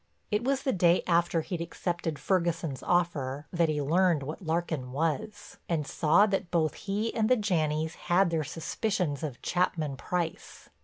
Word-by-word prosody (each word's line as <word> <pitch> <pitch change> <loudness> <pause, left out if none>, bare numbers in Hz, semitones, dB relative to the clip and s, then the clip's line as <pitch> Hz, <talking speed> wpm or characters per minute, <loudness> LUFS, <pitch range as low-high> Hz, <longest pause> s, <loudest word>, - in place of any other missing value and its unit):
It 210 +2 +1
was 270 +1 0
the 265 - +1
day 175 -1 +4
after 170 -1 +2
he'd 170 +1 -4
accepted 170 -2 -3
Ferguson's 170 -7 0
offer 150 -6 0
that 170 -2 +2
he 150 -1 0
learned 170 0 +3
what 155 +7 -6
Larkin 160 -6 -2
was, 160 +7 -2
and 160 -4 0
saw 165 +8 +4
that 195 -4 -1
both 160 -3 +1
he 210 +3 -2
and 220 -1 +1
the 255 - +5
Janneys 160 -6 0 0.2
had 175 0 +4
their 160 -2 0
suspicions 165 - -2
of 145 -6 -5
Chapman 160 -6 0
Price. 175 0 -4
170 Hz, 160 wpm, -29 LUFS, 155-185 Hz, 0.2 s, the